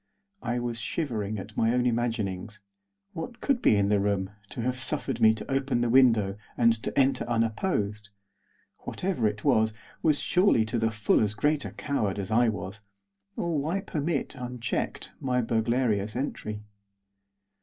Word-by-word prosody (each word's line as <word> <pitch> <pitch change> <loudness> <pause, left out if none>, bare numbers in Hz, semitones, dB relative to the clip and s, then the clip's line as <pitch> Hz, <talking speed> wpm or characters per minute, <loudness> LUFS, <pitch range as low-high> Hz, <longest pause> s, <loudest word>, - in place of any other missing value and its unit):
I 120 0 -1
was 120 -1 -2
shivering 110 -4 -2
at 105 +2 -8
my 115 +2 +2
own 125 0 +2
imaginings. 110 -4 -1 0.5
What 190 +8 -6
could 275 -4 +1
be - - +5
in 100 0 +2
the 105 -1 +3
room, 100 -1 0 0.2
to - - -5
have 125 +2 -1
suffered 130 - -2
me 110 - +8
to 110 +4 -6
open 135 -2 +1
the 120 -1 +1
window 115 -6 +4 0.2
and 115 -1 +5
to - - -1
enter 135 0 +3
unopposed? 110 - -1 0.7
Whatever 180 - -1
it 105 0 -4
was, 110 0 +3 0.3
was 150 -2 +3
surely 180 - +3
to 115 +2 -1
the 115 0 +2
full 105 -1 +2
as 105 -1 0
great 145 +5 +1
a - - -5
coward 105 -10 -1
as 100 0 -4
I 120 +1 +4
was, 100 0 -5 0.5
or 170 -3 -1
why 160 +7 -1
permit, 160 -6 -2
unchecked, 125 -2 -3
my 125 -1 0
burglarious 110 -2 +1
entry. 110 -5 -4
115 Hz, 160 wpm, -28 LUFS, 105-135 Hz, 0.7 s, me